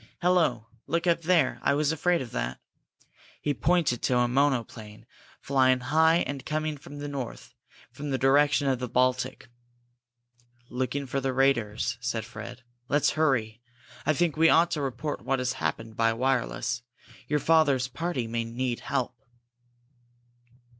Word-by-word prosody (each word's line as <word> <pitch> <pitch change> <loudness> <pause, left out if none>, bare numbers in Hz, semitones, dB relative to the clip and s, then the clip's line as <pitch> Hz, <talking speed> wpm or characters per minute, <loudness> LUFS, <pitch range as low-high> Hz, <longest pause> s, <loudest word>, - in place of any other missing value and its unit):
"Hello 170 -11 +2 0.2
look 170 +4 0
up 170 -1 +2
there! 175 0 +2
I 140 - +2
was 150 0 +1
afraid 170 0 +1
of 120 - -10
that!" 60 +1 -3 0.8
He 145 - -1
pointed 150 -1 +1
to 125 - +1
a 120 0 +3
monoplane, 120 -5 -1 0.3
flying 130 -2 +3
high 160 +6 +3
and 135 -1 -5
coming 155 +1 -2
from 145 +1 -11
the 145 0 -5
north, 135 -4 -6 0.4
from 145 0 -6
the 135 - 0
direction 145 +2 +3
of 130 -2 +1
the 125 -1 -4
Baltic. 130 +1 0 1.2
"Looking 130 +3 -2
for 135 +1 -2
the 135 0 -1
raiders," 120 -3 +1
said 110 -2 -2
Fred. 125 +2 -9 0.3
"Let's 145 0 +3
hurry. 120 -8 0 0.4
I 155 - +2
think 165 0 +1
we 165 +1 +5
ought 170 +1 +4
to 150 - -1
report 140 +2 -3
what 135 - 0
has 130 0 -1
happened 115 -3 -4
by 115 0 +2
wireless. 125 0 -1 0.5
Your 150 - +1
father's 145 -4 +3
party 135 -1 -3
may 115 +1 -2
need 120 +1 -3
help." 125 -3 -2
135 Hz, 150 wpm, -27 LUFS, 120-150 Hz, 1.2 s, we